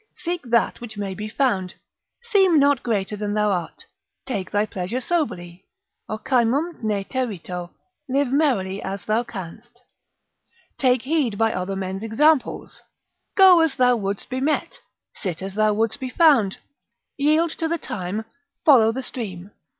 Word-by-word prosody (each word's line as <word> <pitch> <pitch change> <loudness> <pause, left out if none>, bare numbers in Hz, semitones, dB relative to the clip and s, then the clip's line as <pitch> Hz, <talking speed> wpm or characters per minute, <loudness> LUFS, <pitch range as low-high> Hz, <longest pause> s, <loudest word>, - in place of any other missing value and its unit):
Seek 350 0 -3
that 235 -1 +1
which 220 -3 -8
may 200 -2 -3
be 210 +2 -6
found. 200 -8 0 0.5
Seem 390 -8 +4
not 285 -2 +4
greater 210 -3 -1
than 205 0 -3
thou 210 -1 +2
art. 175 -4 -4 0.4
Take 200 -8 -3
thy 205 +1 +1
pleasure 195 +4 -4
soberly. 190 - -3 0.4
Ocymum 260 +8 0
ne 210 -3 -1
terito. 185 -8 -4 0.4
Live 270 0 +1
merrily 205 -11 +1
as 195 0 -5
thou 215 +2 +1
canst. 230 +3 -9 1.0
Take 255 -2 +3
heed 270 -7 0
by 225 +1 +2
other 185 +2 -3
men's 190 +1 -4
examples. 270 +6 +1 0.6
Go 375 -3 +8
as 325 -3 +2
thou 250 -1 +4
wouldst 200 -3 -3
be 255 +1 -3
met, 310 - -1 0.3
sit 180 -6 -4
as 195 0 -5
thou 215 +1 +2
wouldst 225 +4 0
be 260 -1 -4
found, 260 - +4 0.6
yield 310 +3 +2
to 325 - -2
the 335 +1 -1
time, 205 - -4 0.4
follow 235 -7 +6
the 260 +3 -4
stream. 200 -7 -6
225 Hz, 150 wpm, -23 LUFS, 195-280 Hz, 1.0 s, Go